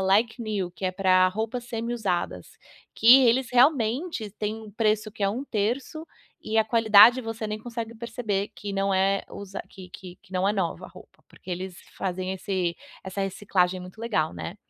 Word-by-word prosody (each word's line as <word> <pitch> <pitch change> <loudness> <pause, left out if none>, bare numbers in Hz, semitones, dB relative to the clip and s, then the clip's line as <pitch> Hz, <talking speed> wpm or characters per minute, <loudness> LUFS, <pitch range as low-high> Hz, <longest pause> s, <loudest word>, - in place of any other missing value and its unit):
Like 215 +5 +2
New, 200 -5 -2
que 190 - -8
é 185 - 0
pra 185 -1 +4
roupas 225 +5 -4
semi 235 0 -4
usadas, 200 -7 -3 0.4
que 250 +3 +7
eles 240 +1 +2
realmente 250 - +2
têm 215 0 -3
um 215 - -11
preço 215 0 0
que 215 - -20
é 195 - +3
1/3 250 +6 -3 0.4
e 220 - -3
a 220 - +4
qualidade 225 +2 +6
você 225 -1 -5
nem 215 0 -4
consegue 230 0 -6
perceber 220 -3 -3
que 205 -1 -6
não 195 0 0
é 195 +1 +2
usa 200 -1 -7
que 185 -2 -12
que 180 -1 -10
que 190 - -20
não 185 +2 +1
é - - +2
nova 195 - -2
a - - -14
roupa, - - -17
porque - - -13
eles 180 +1 -5 0.2
fazem 185 0 -3
esse 185 -2 -2 0.3
essa 190 +1 -5
reciclagem 185 -2 0
muito 180 +4 -11
legal, 185 -9 0
né. 185 - -6
210 Hz, 185 wpm, -26 LUFS, 190-230 Hz, 0.4 s, que